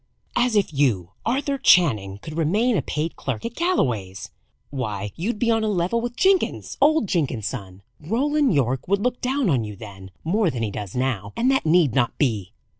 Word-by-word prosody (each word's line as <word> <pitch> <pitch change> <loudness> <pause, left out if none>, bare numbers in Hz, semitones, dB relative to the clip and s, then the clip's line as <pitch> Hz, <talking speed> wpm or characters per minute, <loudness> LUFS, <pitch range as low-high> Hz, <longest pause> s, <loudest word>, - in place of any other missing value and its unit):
"As 245 -2 +2
if 200 -6 +1
you, 115 -11 +1 0.2
Arthur 275 +3 0
Channing, 110 - +4
could 155 -1 -7
remain 205 +10 +2
a - - +2
paid 155 +2 -3
clerk - - -4
at 230 - -4
Galloway's! 120 - -1 0.4
Why, 105 -7 -4
you'd 210 +7 -2
be 230 +2 +1
on 225 -1 +1
a - - 0
level 200 +3 0
with 240 0 -4
Jenkins 380 -1 +1
old 305 -2 +4
Jenkins's 135 - -1
son. 95 -6 -9 0.2
Roland 275 - +1
Yorke 130 -4 0
would 200 +2 +1
look 250 0 -1
down 260 0 0
on 135 -9 +2
you 105 -1 -7
then; 95 -2 -11
more 195 +3 +1
than 120 -6 -3
he 105 - -2
does 100 0 -6
now. 120 -6 -2
And 250 +3 +3
that 265 -11 +1
need 160 -6 +4
not 120 -2 +1
be!" 110 - 0
160 Hz, 190 wpm, -23 LUFS, -, 0.4 s, Channing